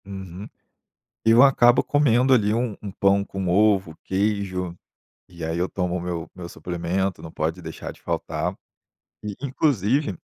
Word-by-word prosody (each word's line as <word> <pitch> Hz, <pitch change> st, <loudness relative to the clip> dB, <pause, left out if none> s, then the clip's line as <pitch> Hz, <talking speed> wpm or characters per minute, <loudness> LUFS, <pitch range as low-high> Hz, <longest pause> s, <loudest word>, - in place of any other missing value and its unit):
Uhum. 95 Hz, 0 st, -8 dB, 0.8 s
Eu 115 Hz, +3 st, +7 dB
acabo 120 Hz, -3 st, +5 dB
comendo 135 Hz, -3 st, +3 dB
ali 105 Hz, -4 st, +3 dB
um 115 Hz, -2 st, -1 dB
um 100 Hz, -, -6 dB
pão 100 Hz, 0 st, +2 dB
com 95 Hz, -2 st, -4 dB
ovo, 95 Hz, -3 st, +3 dB
queijo, 95 Hz, -3 st, -1 dB, 0.5 s
e 85 Hz, -2 st, -10 dB
aí 80 Hz, +1 st, -2 dB
eu 90 Hz, +2 st, 0 dB
tomo 90 Hz, -2 st, -2 dB
o -, -, -3 dB
meu 85 Hz, -2 st, -4 dB
meu 90 Hz, -2 st, -7 dB
suplemento, 90 Hz, +2 st, -3 dB
não 80 Hz, -, -9 dB
pode 80 Hz, +4 st, -2 dB
deixar 80 Hz, -1 st, -7 dB
de -, -, -18 dB
faltar. -, -, -2 dB, 0.7 s
E 105 Hz, -1 st, -4 dB
inclusive, 130 Hz, -, +1 dB
95 Hz, 150 wpm, -24 LUFS, 90-110 Hz, 0.8 s, Eu